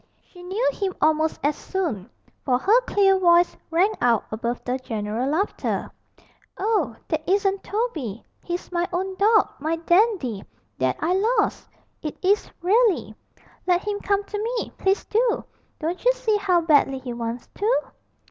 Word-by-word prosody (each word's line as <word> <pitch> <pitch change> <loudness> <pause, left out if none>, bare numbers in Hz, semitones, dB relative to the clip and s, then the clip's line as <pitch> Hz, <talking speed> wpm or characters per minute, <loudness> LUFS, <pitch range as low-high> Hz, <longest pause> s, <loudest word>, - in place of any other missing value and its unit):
She 355 - -16
knew 390 +8 -1
him 385 -2 -3
almost 315 +1 +2
as 290 +1 +2
soon, 290 - -3 0.3
for 250 -2 +2
her 430 - +4
clear 390 -2 +4
voice 345 -1 +4
rang 355 +6 +3
out 235 -3 +3
above 235 +2 -3
the 255 +1 -2
general 225 +1 -3
laughter. 360 +8 -1 0.7
'Oh, 390 - 0
that 315 -1 -1
isn't 390 0 +1
Toby 320 - -3 0.2
he's 350 +1 -5
my 350 0 0
own 375 +2 -2
dog, 430 +1 +4
my 315 +3 -1
Dandy, 340 - +1 0.4
that 130 0 +1
I 330 +3 +1 0.2
lost! - - 0 0.3
It 305 - -5
is 400 +3 +2
really; 425 +2 +3 0.5
let 360 +2 +2
him 410 -1 -1
come 405 0 0
to 415 +1 -5
me, 470 +1 -2
please 385 +1 0
do! 460 +2 +1 0.3
Don't 340 +3 -3
you - - +6
see 480 -4 0
how 370 -4 +2
badly 290 -4 +3
he 255 -2 -6
wants 235 0 -5
to?' 450 +5 +1
355 Hz, 155 wpm, -24 LUFS, 275-410 Hz, 0.7 s, you